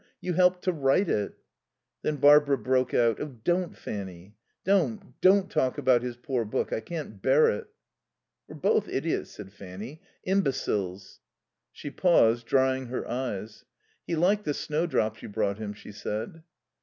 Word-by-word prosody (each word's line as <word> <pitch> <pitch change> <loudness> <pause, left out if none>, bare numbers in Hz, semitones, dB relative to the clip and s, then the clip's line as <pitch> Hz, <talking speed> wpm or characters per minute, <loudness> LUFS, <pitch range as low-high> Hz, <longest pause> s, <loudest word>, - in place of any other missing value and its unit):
You 180 - -3
helped 180 +1 +3
to 185 - +2
write 150 +4 +2
it." 105 -1 -1 0.6
Then 150 - -1
Barbara 145 0 +6
broke 130 -1 +1
out. 115 -3 +2
"Oh, 145 -4 -6
don't, 175 +3 0
Fanny, 95 0 -7 0.3
don't, 200 +2 +1
don't 190 +1 +5
talk 130 -7 0
about 130 -4 +3
his 125 -1 -5
poor 125 -2 -2
book. 105 - -2
I - - 0
can't 110 - -7
bear 135 +7 +4
it." 105 - -5 0.8
"We're - - -10
both - - +1
idiots," - - -2
said 95 -1 -11
Fanny. 100 +10 -9 0.2
"Imbeciles." 105 - -1 0.5
She 145 - -8
paused, 120 -10 +3
drying 130 -1 +2
her 125 - -4
eyes. 115 -4 -4 0.4
"He 170 - -1
liked 195 +6 +2
the 145 - -1
snowdrops 150 -9 -1
you - - -8
brought 100 -1 -1
him," 105 -2 -4
she 105 0 -11
said. 110 +8 -5
130 Hz, 155 wpm, -27 LUFS, 110-165 Hz, 0.8 s, Barbara